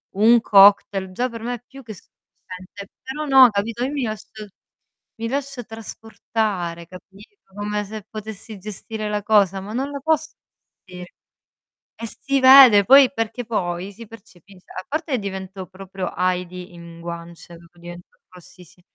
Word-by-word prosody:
un 230 +4 +5
cocktail, 200 -2 +4
già 245 +7 -2
per 230 -1 -9
me 245 +2 -3
è 240 - -14
più 270 +1 -14
che 225 -2 -9
sufficiente. 185 +1 -14
Però, 295 +4 -6
no, 265 -3 +7
capito, 225 +3 -3
io 265 - -2
mi 285 -2 -3
lascio 215 -1 -7 0.7
mi 230 0 -4
lascio 275 -1 -4
trasportare, 215 -6 -5
capito, 195 - -16 0.2
come 210 0 -3
se 215 +1 -8
potessi 215 0 -9
gestire 215 +2 -6
la 210 0 -2
cosa, 200 -3 +3
ma 205 +2 -8
non 270 +4 -3
la 280 - -5
posso 310 +1 0 0.5
gestire. 180 -1 -11 0.9
E 230 - -4
si 275 +4 -2
vede, 260 -6 +8
poi 270 +3 +7
perché 230 0 -4
poi 185 -4 -3
si 230 +3 -12
percepisc 195 -4 -18
A 185 - -8
parte 310 -3 -2
divento 190 -2 -7
proprio 190 0 -7
Heidi 180 0 -3
in 170 -1 -12
guance, 170 0 -9
proprio 170 +1 -20
divento 175 +1 -12
rossissi 180 -1 -17
210 Hz, 150 wpm, -21 LUFS, 185-235 Hz, 0.9 s, vede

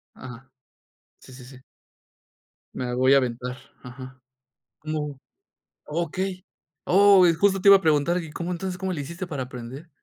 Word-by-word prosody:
Ajá. 130 +1 -12 0.7
Sí, - - -16
sí, 125 0 -12
sí. 130 0 -14 1.1
Me 125 -1 -4
voy 130 +2 +4
a - - +7
aventar, 125 -1 -3 0.3
ajá, 130 +1 -11 0.6
como 150 -2 -5 0.7
okey. 180 +4 -4 0.4
Oh, 195 -1 +6
justo 195 +1 +2
te 200 - +3
iba 200 - +10
a - - -2
preguntar 160 +2 +2
que, 165 - -8
¿y - - -11
cómo, 170 +3 -5
entonces, 180 +1 -5
cómo 190 -1 -3
le 145 - -4
hiciste 170 +6 -7
para 145 -6 -4
aprender? 125 +5 -9
150 Hz, 155 wpm, -24 LUFS, 130-180 Hz, 1.1 s, iba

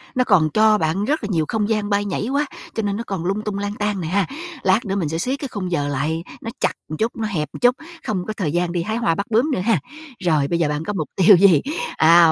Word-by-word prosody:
nó 255 - +3
còn 160 -10 +4
cho 215 +5 +4
bạn 170 +3 0
rất 300 +2 0
là - - -2
nhiều 160 -3 +1
không 215 -1 -1
gian 215 -2 0
bay 205 0 +1
nhảy 205 +2 -2
quá, 285 +2 +1 0.3
cho 225 - -2
nên 200 -1 -1
nó 230 - -3
còn 190 -4 -3
lung 195 +3 0
tung, 210 -2 -4
lang 205 0 -3
tang 210 -2 -1
nè 160 - -3
ha. 195 +4 +1 0.4
Lát 190 +5 +3
nữa 195 -1 -2
mình 175 -7 -1
sẽ 160 - -2
siết 255 +11 -2
cái 280 - -4
khung 185 -4 -4
giờ 145 -4 0
lại, 150 +4 -1 0.2
nó 225 - -5
chặt - - +2 0.2
một 155 - -4
chút, 225 +2 0
nó 220 -1 -2
hẹp 155 -8 -2
một - - -8
chút, 245 0 +5 0.3
không 185 -4 -1
có 215 - -2
thời 185 -8 -2
gian 175 +1 0
đi 175 -1 -1
hái 220 +4 -2
hoa 170 -9 +1
bắt 200 - -2
bướm 235 +7 +2
nữa 265 - 0
ha. 210 -1 +2 0.4
Rồi 155 -5 +2
bây 170 +3 0
giờ 165 - +2
bạn 150 +1 -2
có 210 - -2
mục 160 -6 -3
tiêu 190 +2 +7
gì? 180 -4 +6 0.4
À, 165 0 +7
195 Hz, 290 wpm, -21 LUFS, 165-215 Hz, 0.4 s, tiêu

